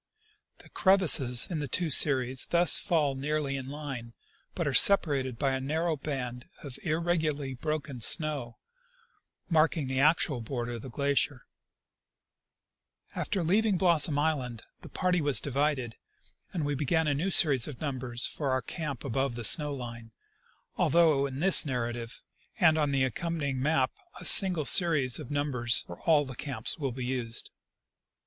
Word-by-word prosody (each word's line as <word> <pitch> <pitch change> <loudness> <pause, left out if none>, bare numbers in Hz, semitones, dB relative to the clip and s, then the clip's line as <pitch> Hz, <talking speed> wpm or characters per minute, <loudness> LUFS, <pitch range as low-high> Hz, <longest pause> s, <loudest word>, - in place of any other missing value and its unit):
The - - -18
crevasses 155 -11 +3
in 170 -5 -5
the 145 - -4
two 165 +5 -1
series 130 -2 +4
thus 175 0 +4
fall 150 -5 0
nearly 140 +1 -3
in 135 -1 -7
line, 135 -5 -8 0.4
but 170 - -3
are 140 - -2
separated 135 -5 +4
by 135 +1 -1
a 130 - -2
narrow 160 +5 -2
band 130 -4 -7
of 140 -3 -9
irregularly 155 -4 -2
broken 145 -1 -5
snow, 140 -2 +1 0.9
marking 160 -2 +1
the 130 0 -3
actual 150 -3 +1
border 120 +1 -5
of 120 -2 -7
the 130 - -10
glacier, 140 0 -1 1.7
f - - -15
After 190 - -2
leaving 200 +4 +1
Blossom 170 -5 +2
island 135 -7 -2 0.2
the - - -12
party 180 -2 -1
was 145 -5 +3
divided, 140 -4 -2 0.5
and 165 -5 -4
we 145 - -2
began 155 +4 -1
a 145 - 0
new 160 +8 -2
series 140 -9 +4
of 145 -5 -9
numbers 130 -5 -3
for 145 -3 -3
our 130 0 -1
camp 150 -7 -6
above 135 0 -2
the 120 - -7
snow 150 +5 +5
line, 120 -4 -9 0.6
although 155 -5 +2
in 135 +1 -7
this 190 +1 +7
narrative 120 -4 -5 0.4
and 160 -5 +4
on 150 -2 0
the 135 -1 0
accompanying 140 0 -3
map 135 -2 0 0.3
a - - -11
single 180 -6 +5
series 150 -9 +3
of - - -9
numbers 135 -5 +1
for 85 - -11
all 150 -3 +3
the 130 -1 -9
camps 140 +4 -6
will 135 -3 -3
be 125 +1 -6
used. 125 -3 -2
140 Hz, 155 wpm, -28 LUFS, 130-160 Hz, 1.7 s, this